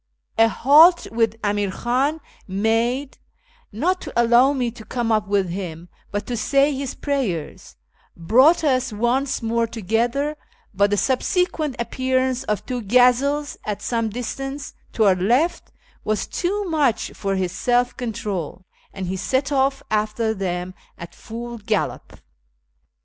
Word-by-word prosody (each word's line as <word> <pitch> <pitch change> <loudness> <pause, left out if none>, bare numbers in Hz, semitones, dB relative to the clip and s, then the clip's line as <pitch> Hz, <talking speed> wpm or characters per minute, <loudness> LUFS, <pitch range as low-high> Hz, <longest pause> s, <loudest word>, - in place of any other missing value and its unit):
A 225 - +7
halt 310 +9 +6
which 225 -1 +1
Amir 205 -1 0
Khan 265 +10 -1 0.3
made 225 +7 0 0.5
(not 355 - 0
to - - -7
allow 240 +3 +5
me 250 -4 -1
to 230 -1 -12
come 235 0 -2
up 215 -2 +1
with 200 -2 +1
him, 175 -2 -6 0.2
but 205 0 -3
to 245 - -3
say 275 +5 +2
his 270 -1 -4
prayers) 240 - -3 0.4
brought 255 - +4
us 260 -4 +1
once 240 +5 0
more 230 +1 +1
together, 235 +7 -1 0.4
but 200 +1 +3
the 205 - +1
subsequent 300 - 0
appearance 260 +1 -1
of 210 -4 -2
two 250 -2 -3
gazelles 250 +6 +2
at 205 -1 -4
some 230 -2 -1
distance 270 +5 -5 0.2
to 220 - +2
our 195 -2 +6
left 240 - 0 0.3
was 215 0 -1
too 400 +3 -2
much 295 -9 +1
for 195 -1 -2
his 185 -2 -1
self 245 +5 +1
control, 210 - -4 0.3
and 190 -2 -5
he 185 +1 -3
set 265 +9 -1
off 270 0 +1
after 215 +1 0
them 185 -2 -3 0.2
at 170 -1 -9
full 235 +1 -8
gallop. 210 -1 -3
235 Hz, 140 wpm, -22 LUFS, 205-270 Hz, 0.5 s, A